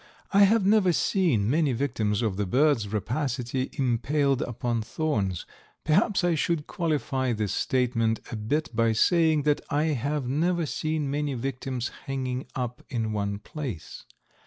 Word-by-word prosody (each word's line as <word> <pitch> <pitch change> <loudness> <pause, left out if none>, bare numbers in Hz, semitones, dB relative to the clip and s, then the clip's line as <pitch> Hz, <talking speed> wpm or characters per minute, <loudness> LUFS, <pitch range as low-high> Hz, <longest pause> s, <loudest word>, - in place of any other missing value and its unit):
I 200 0 +7
have 210 0 +3
never 200 -3 +4
seen 155 - +2
many 145 +1 +2
victims 115 -4 0
of 105 -4 0
the 100 0 -1
bird's 130 0 +3
rapacity 125 +4 -2
impaled 135 +2 +1
upon 120 -1 -2
thorns. 105 - -2 0.4
Perhaps 190 +5 +2
I 175 -1 +3
should 160 -1 0
qualify 135 -6 -1
this 105 -3 -2
statement 115 -3 +1
a - - -3
bit 115 +5 -2
by 115 0 +3
saying 160 +4 +3
that 150 0 +2
I 150 0 +1
have 140 +1 -2
never 170 +5 +1
seen 155 -1 -2
many 145 -1 -1
victims 130 0 -3 0.2
hanging 130 -1 -3
up 125 -2 -3
in 115 -4 -2
one 100 -1 -1
place. 125 - -7
135 Hz, 145 wpm, -27 LUFS, 115-155 Hz, 0.4 s, I